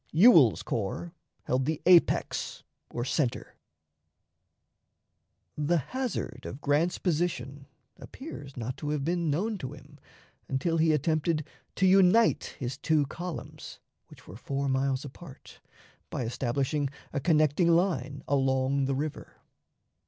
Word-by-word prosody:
Ewell's 160 Hz, -, +6 dB
corps 115 Hz, -, -3 dB, 0.3 s
held 130 Hz, +1 st, 0 dB
the 155 Hz, +1 st, -1 dB
apex 175 Hz, -1 st, +3 dB, 0.3 s
or 120 Hz, -, -4 dB
center. 135 Hz, -2 st, -1 dB, 2.0 s
The 150 Hz, +3 st, +1 dB
hazard 255 Hz, -, -4 dB
of 130 Hz, -, -7 dB
Grant's 150 Hz, +5 st, +1 dB
position 155 Hz, -5 st, -2 dB, 0.3 s
appears 145 Hz, -, -10 dB
not 125 Hz, +2 st, -4 dB
to 150 Hz, -, -4 dB
have 150 Hz, -2 st, -1 dB
been 170 Hz, -1 st, 0 dB
known 200 Hz, +8 st, -1 dB
to 130 Hz, -2 st, -6 dB
him 145 Hz, 0 st, -15 dB, 0.5 s
until 145 Hz, +5 st, 0 dB
he 160 Hz, 0 st, +3 dB
attempted 155 Hz, +1 st, 0 dB, 0.3 s
to 190 Hz, -, +2 dB
unite 195 Hz, +4 st, +4 dB
his 130 Hz, +1 st, -5 dB
two 155 Hz, -3 st, +2 dB
columns, 175 Hz, +4 st, -7 dB, 0.3 s
which -, -, -17 dB
were 90 Hz, -, -10 dB
four 140 Hz, +3 st, -3 dB
miles 135 Hz, +1 st, 0 dB
apart, 140 Hz, 0 st, -12 dB, 0.5 s
by -, -, -3 dB
establishing 135 Hz, +4 st, -1 dB, 0.2 s
a 145 Hz, -, 0 dB
connecting 155 Hz, +1 st, +3 dB
line 150 Hz, -6 st, +1 dB
along 135 Hz, 0 st, +1 dB
the 135 Hz, 0 st, 0 dB
river. 150 Hz, +2 st, -5 dB
145 Hz, 125 wpm, -28 LUFS, 135-170 Hz, 2.0 s, Ewell's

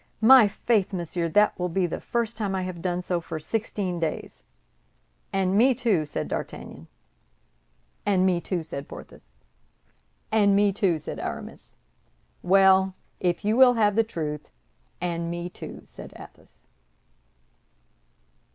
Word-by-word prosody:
"My 240 Hz, 0 st, +8 dB
faith, 205 Hz, -1 st, 0 dB
monsieur! 170 Hz, -1 st, -2 dB
that 210 Hz, +3 st, +3 dB
will 180 Hz, 0 st, -1 dB
be 180 Hz, +2 st, +1 dB
the 170 Hz, -, -4 dB
first 235 Hz, -1 st, -2 dB
time 205 Hz, -3 st, -2 dB
I 190 Hz, -, -1 dB
have 180 Hz, -2 st, -6 dB
done 180 Hz, 0 st, -2 dB
so 175 Hz, -1 st, -1 dB
for 165 Hz, -1 st, -6 dB
sixteen 190 Hz, 0 st, -3 dB
days." 165 Hz, -2 st, -4 dB, 0.9 s
"And 190 Hz, 0 st, +1 dB
me, 250 Hz, +4 st, +5 dB
too!" 210 Hz, -, +1 dB
said 150 Hz, -, -3 dB
D'Artagnan. 80 Hz, +2 st, -6 dB, 1.2 s
"And 190 Hz, -2 st, +2 dB
me, 180 Hz, -2 st, +2 dB
too!" 175 Hz, -2 st, -3 dB
said 145 Hz, -3 st, -7 dB
Porthos. -, -, -12 dB, 1.0 s
"And 205 Hz, -2 st, +4 dB
me, 200 Hz, 0 st, +3 dB
too!" 185 Hz, -4 st, +1 dB
said 155 Hz, -, -7 dB
Aramis. -, -, -7 dB, 0.7 s
"Well, 190 Hz, 0 st, +4 dB, 0.2 s
if 175 Hz, +2 st, -1 dB
you 215 Hz, +2 st, +2 dB
will 255 Hz, 0 st, +7 dB
have 210 Hz, -3 st, +2 dB
the 225 Hz, -, +4 dB
truth, 155 Hz, -8 st, -5 dB, 0.5 s
and 170 Hz, -1 st, -2 dB
me, 175 Hz, +1 st, -4 dB
too!" -, -, -9 dB
said -, -, -12 dB
Athos. -, -, -16 dB
190 Hz, 140 wpm, -25 LUFS, 170-210 Hz, 1.2 s, My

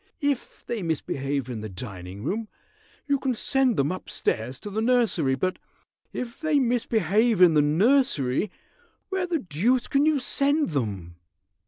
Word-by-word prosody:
If 285 Hz, -3 st, -2 dB
they 235 Hz, -3 st, -3 dB
misbehave 140 Hz, -5 st, -2 dB
in 120 Hz, -4 st, -5 dB
the 110 Hz, -, -6 dB
dining 95 Hz, -1 st, -8 dB
room 220 Hz, -, -2 dB, 0.6 s
you 280 Hz, -1 st, +1 dB
can 260 Hz, -2 st, -1 dB
send 265 Hz, 0 st, +1 dB
them 140 Hz, +3 st, +2 dB
up 185 Hz, -, -6 dB
stairs 120 Hz, +4 st, -2 dB
to 205 Hz, -, -6 dB
the 215 Hz, +2 st, -1 dB
nursery, 225 Hz, -, +2 dB
but 185 Hz, +8 st, -2 dB, 0.5 s
if 235 Hz, -2 st, -6 dB
they 310 Hz, -2 st, +1 dB
misbehave 230 Hz, -, +2 dB
in 180 Hz, -3 st, +7 dB
the 150 Hz, -, +5 dB
nursery, 170 Hz, -, +2 dB, 0.6 s
where 380 Hz, -2 st, -1 dB
the 345 Hz, -2 st, 0 dB
deuce 230 Hz, -, 0 dB
can 285 Hz, +2 st, +2 dB
you 310 Hz, -2 st, +3 dB
send 285 Hz, +2 st, +2 dB
them?" 100 Hz, -, -3 dB
205 Hz, 155 wpm, -25 LUFS, -, 0.6 s, in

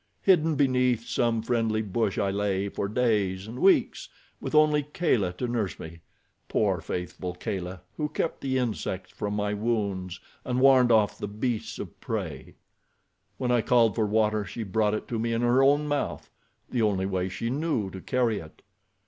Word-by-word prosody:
Hidden 165 Hz, -4 st, +4 dB
beneath 125 Hz, -4 st, +2 dB
some 115 Hz, -3 st, 0 dB
friendly 115 Hz, -2 st, 0 dB
bush 105 Hz, 0 st, -1 dB
I 100 Hz, -, +1 dB
lay 100 Hz, 0 st, -1 dB
for 100 Hz, -, -3 dB
days 105 Hz, -5 st, 0 dB
and 115 Hz, +4 st, -8 dB
weeks 190 Hz, +4 st, +3 dB, 0.3 s
with -, -, -4 dB
only 150 Hz, -1 st, +5 dB
Kala 140 Hz, -, 0 dB
to 125 Hz, +8 st, -3 dB
nurse 110 Hz, -8 st, -2 dB
me—poor, 85 Hz, +3 st, -4 dB
faithful 90 Hz, +1 st, -5 dB
Kala, 90 Hz, 0 st, -5 dB, 0.2 s
who 150 Hz, -1 st, -1 dB
kept 160 Hz, -, -2 dB
the 130 Hz, -1 st, 0 dB
insects 110 Hz, -6 st, -3 dB
from 105 Hz, 0 st, -3 dB
my 105 Hz, 0 st, -1 dB
wounds 100 Hz, -4 st, -2 dB, 0.2 s
and 125 Hz, 0 st, -1 dB
warned 130 Hz, -2 st, +6 dB
off 110 Hz, -2 st, +3 dB
the -, -, -3 dB
beasts 110 Hz, +2 st, -3 dB
of -, -, -8 dB
prey. -, -, -5 dB, 0.8 s
"When 125 Hz, -1 st, -1 dB
I 120 Hz, -1 st, +3 dB
called 115 Hz, -2 st, +4 dB
for 110 Hz, 0 st, 0 dB
water 105 Hz, 0 st, +2 dB
she 110 Hz, +4 st, -6 dB
brought 105 Hz, +1 st, +1 dB
it -, -, -5 dB
to 115 Hz, -, -2 dB
me 115 Hz, +1 st, -1 dB
in 115 Hz, +1 st, 0 dB
her 120 Hz, +2 st, +4 dB
own 145 Hz, +2 st, +4 dB
mouth—the 145 Hz, -3 st, -4 dB
only 100 Hz, -3 st, +1 dB
way 95 Hz, -1 st, -1 dB
she 115 Hz, +6 st, -3 dB
knew 135 Hz, -, -1 dB
to 95 Hz, -, -8 dB
carry 120 Hz, -3 st, 0 dB
it. 80 Hz, -4 st, -13 dB
110 Hz, 170 wpm, -27 LUFS, 100-125 Hz, 0.8 s, warned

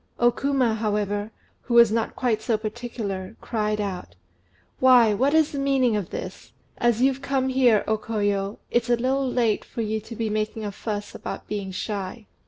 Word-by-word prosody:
O 240 Hz, 0 st, +4 dB
Kuma, 270 Hz, -3 st, +1 dB
however, 210 Hz, -1 st, -1 dB, 0.4 s
who 240 Hz, -, -1 dB
was 235 Hz, -2 st, +7 dB
not 225 Hz, 0 st, -1 dB
quite 230 Hz, -4 st, 0 dB
so 220 Hz, 0 st, +1 dB
particular, 215 Hz, -3 st, -5 dB
cried 210 Hz, -2 st, -1 dB
out 195 Hz, -3 st, -4 dB, 0.6 s
"Why, 245 Hz, -4 st, +6 dB
what 270 Hz, +8 st, +2 dB
is 315 Hz, -2 st, +4 dB
the 280 Hz, -, -4 dB
meaning 270 Hz, -4 st, +2 dB
of 205 Hz, -3 st, -2 dB
this? -, -, -7 dB, 0.3 s
As 240 Hz, 0 st, +2 dB
you've 270 Hz, 0 st, +2 dB
come 270 Hz, -1 st, 0 dB
here, 250 Hz, -5 st, +4 dB
O 220 Hz, 0 st, 0 dB
Koyo, 205 Hz, -2 st, -1 dB
it's 240 Hz, 0 st, +1 dB
a 240 Hz, -, +5 dB
little 260 Hz, +2 st, 0 dB
late 230 Hz, -4 st, +1 dB
for 230 Hz, -, -5 dB
you 220 Hz, 0 st, -1 dB
to 225 Hz, +2 st, -10 dB
be 225 Hz, 0 st, -2 dB
making 215 Hz, +1 st, -2 dB
a 205 Hz, -, -3 dB
fuss 205 Hz, 0 st, -5 dB
about -, -, -7 dB
being 205 Hz, -2 st, -4 dB
shy. 200 Hz, +3 st, -5 dB
225 Hz, 185 wpm, -24 LUFS, 210-250 Hz, 0.6 s, was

